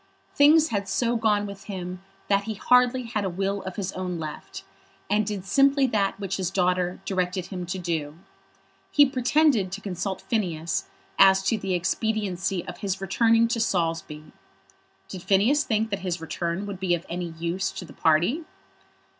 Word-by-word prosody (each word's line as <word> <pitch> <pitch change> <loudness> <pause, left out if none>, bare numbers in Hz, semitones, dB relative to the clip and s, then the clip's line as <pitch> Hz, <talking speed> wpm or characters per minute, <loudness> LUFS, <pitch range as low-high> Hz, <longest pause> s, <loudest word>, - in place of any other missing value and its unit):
Things 310 +2 +5
had 200 -2 -2
so 235 +5 +1
gone 215 -2 +2
with 200 -1 -9
him 185 -2 -6 0.3
that 200 0 +2
he 220 -1 -4
had 195 - -14
hardly 250 -1 +3
a 200 -3 0
will 195 +2 -2
of 190 -1 -7
his 195 -2 -3
own 180 -1 -4
left, 155 -2 -7 0.5
and 210 0 +2
did 200 -3 -4
simply 275 +6 +4
that 205 -5 0
which 195 -2 -3
his 185 -3 -1
daughter 180 -1 0
directed 185 -1 -1
him 180 -1 -6
to 190 +2 -3
do. 160 -4 -3 0.7
He 290 - +6
pretended 260 -5 +2
to 195 - -5
consult 195 -1 -4
Phineas 170 -7 -2 0.3
as 190 0 +6
to 200 - +1
the 195 -2 -1
expediency 195 -1 -1
of 180 - -8
his 195 -1 -2
returning 225 +4 +3
to 230 - -1
Saulsby. 165 -6 -2 0.8
Did 185 - -8
Phineas 205 - +3
think 220 -1 0
that 200 - -1
his 180 -2 -3
return 170 +3 -3
would 200 -2 -6
be 185 -2 +2
of 170 - -8
any 175 -1 -4
use 170 +3 -1
to 180 - -7
the 155 - -13
party? 175 - +2
195 Hz, 170 wpm, -25 LUFS, 180-220 Hz, 0.8 s, He